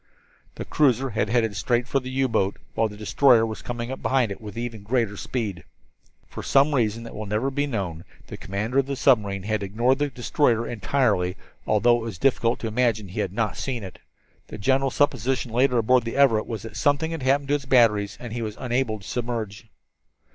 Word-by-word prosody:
The - - -6
cruiser 135 -3 +2
had 105 -1 -1
headed 115 -3 +1
straight 120 +2 0
for 135 - +1
the 130 0 -8
U 130 +1 +1
boat, 100 -4 0 0.2
while 115 - +1
the 105 - -11
destroyer 115 +2 +4
was 110 -1 -6
coming 120 0 -5
up 130 - -6
behind 130 -5 +1
it 100 - -7
with 105 -1 -9
even 115 -2 -5
greater 110 -1 0
speed. 100 -7 -4 0.6
For - - -8
some 140 +2 +3
reason 115 -3 0
that 115 - -9
never 105 +1 -3
will - - -9
be 145 +1 -1
known 95 - -4 0.2
the - - -8
commander 105 +7 -2
of 135 - 0
the 140 - -2
submarine 105 -8 +2
had 110 0 -1
ignored 120 +7 +1
the 145 0 0
destroyer 120 -2 +1
entirely, 100 -5 0 0.3
although 120 +3 +4
it - - -5
was 115 -6 -6
difficult 120 +2 +2
to 115 - -2
imagine 110 -2 +1
that 90 - -12
he - - -4
had 100 -3 -1
not 105 -1 -2
seen 125 -5 -3
it. 95 -2 -9 0.5
The - - -8
general 135 +5 +2
supposition 130 -3 0
later 125 +1 +3
aboard 120 +2 +3
the 115 - -5
Everett 120 -6 +4
was 110 -3 -5
that 115 -1 -8
something 145 +6 +1
had 165 -3 -4
happened 140 +2 +1
to - - +2
his 145 -1 -1
batteries 110 -6 +3
and 120 -3 -7
he 120 - -3
was 105 -2 -5
unable 125 -3 -1
to - - -12
submerge. 115 -3 -4
115 Hz, 210 wpm, -24 LUFS, 105-130 Hz, 0.6 s, destroyer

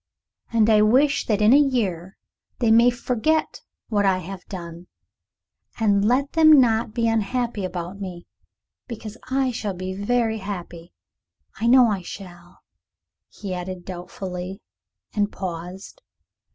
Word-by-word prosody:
And 225 -2 +3
I 215 -1 +5
wish 265 +7 +3
that 210 -2 +1
in 215 +4 +6
a 285 - +7
year 200 - -1 0.4
they 235 -3 +2
may 235 +2 +6
forget 250 +6 -1 0.3
what 205 -3 +1
I 190 -2 +3
have 185 +1 -8
done, 170 -2 -8 0.9
and 205 -3 +3
let 255 +6 +1
them 310 -3 +7
not 225 -3 +2
be 230 -1 +1
unhappy 225 0 -1
about 180 +1 -5
me, 180 -3 -7 0.6
because 220 -3 -7
I 265 0 +1
shall 210 -4 -4
be 185 +1 -5
very 220 +2 0
happy. 175 -4 -7 0.7
I 230 - -1
know 250 +1 +7
I 205 -5 0
shall," 175 -1 -11 0.7
he 195 -3 -7
added 180 0 -6
doubtfully, 180 +1 -7 0.5
and 205 -1 0
paused. 185 - -7
205 Hz, 135 wpm, -23 LUFS, 185-235 Hz, 0.9 s, a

